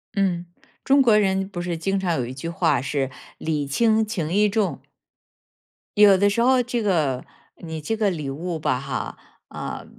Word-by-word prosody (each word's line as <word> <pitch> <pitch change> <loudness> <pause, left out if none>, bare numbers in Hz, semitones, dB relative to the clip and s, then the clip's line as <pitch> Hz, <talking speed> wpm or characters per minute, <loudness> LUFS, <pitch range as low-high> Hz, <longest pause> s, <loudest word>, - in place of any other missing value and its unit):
嗯， 180 -3 0 0.4
中 275 +1 +5
国 230 -5 +5
人 190 -2 +1
不 175 -3 -5
是 175 -1 -3
经 195 +4 -1
常 180 -3 0
有 125 - -1
一 125 - -6
句 135 +5 -6
话 165 -6 +1
是 135 -1 -1 0.3
礼 150 -3 -2
轻 220 +9 +2
情 175 -7 -3
义 210 +2 +4
重。 205 -1 -1 1.1
有 205 -2 +7
的 200 +2 +3
时 205 +3 0
候 255 +1 +4
这 240 -1 -2
个 150 -10 0 0.3
你 160 -2 -6
这 225 +9 -2
个 210 -2 +2
礼 150 -6 -4
物 165 +5 -4
吧 125 - 0
哈， 135 0 -5 0.3
呃， - - -6
185 Hz, 190 characters per minute, -23 LUFS, 155-210 Hz, 1.1 s, 有